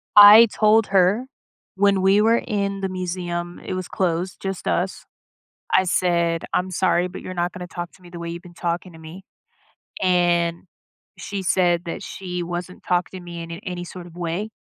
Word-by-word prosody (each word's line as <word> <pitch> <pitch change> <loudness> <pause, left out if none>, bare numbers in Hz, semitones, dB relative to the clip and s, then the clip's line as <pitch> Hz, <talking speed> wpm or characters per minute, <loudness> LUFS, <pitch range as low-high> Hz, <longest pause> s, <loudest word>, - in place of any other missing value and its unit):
I 210 +3 +10
told 215 0 +4
her 195 +5 +3 0.5
when 200 0 +3
we 195 +2 +4
were 230 +2 +4
in 200 -4 -2
the 190 - -1
museum- 175 -1 -4
it - - -3
was 185 -1 -4
closed; 180 0 -2
just 195 -1 -4
us- 185 +2 -1 0.7
I 190 - +5
said, 170 -2 +1
"I'm 185 +1 0
sorry, 180 -1 +1
but 180 - -9
you're 185 - -7
not 175 0 -1
gonna 180 -1 -7
talk 175 0 -7
to 190 - -21
me 175 - -14
the 175 - -8
way 170 - -5
you 170 - -6
been 175 0 -15
talking 175 +1 -3
to 165 - -13
me," 160 +4 -11 0.8
and 175 -2 +2 0.5
she 200 -1 -5
said 175 -1 +2
that 165 - -5
she 180 -2 -5
wasn't 175 +1 -6
talking 180 +1 -1
to 175 - -13
me 170 -1 -7
in 165 - -9
in 170 +2 -7
any 180 -2 -5
sort 175 0 -9
of 170 - -14
way, 175 +5 -3
180 Hz, 195 wpm, -22 LUFS, 175-190 Hz, 0.8 s, I